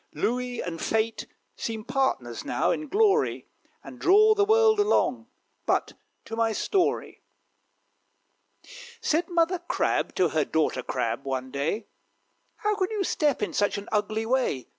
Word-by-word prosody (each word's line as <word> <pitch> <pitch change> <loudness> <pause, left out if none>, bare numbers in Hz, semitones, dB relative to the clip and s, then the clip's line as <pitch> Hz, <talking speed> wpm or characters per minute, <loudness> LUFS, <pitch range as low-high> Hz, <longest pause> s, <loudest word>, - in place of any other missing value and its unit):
Louis 250 0 -1
and 165 -2 -5
Fate 225 +1 -1 0.3
seem 220 -1 -4
partners 265 +1 -1
now, - - 0
in 305 - -3
glory, 425 +5 +2 0.4
And - - -11
draw 425 +4 +6
the 415 -1 +2
world 440 0 +4
along. 415 +1 +1 0.4
But - - +1 0.3
to 225 - -6
my 225 -1 +1
story. 370 - -1 1.8
Said 345 -7 0
Mother 345 +1 +1
Crab 345 - -1
to 180 - +3 0.2
Daughter 155 -5 0
Crab, 115 +2 -2
one 130 -1 -3
day, 145 - -2 0.7
"How 420 0 0
can 375 -2 0
you 425 -3 -1
step 295 - 0
in - - -2
such 205 0 +1
an 200 - -7
ugly 215 +1 0
way? 245 - 0
250 Hz, 140 wpm, -26 LUFS, -, 1.8 s, draw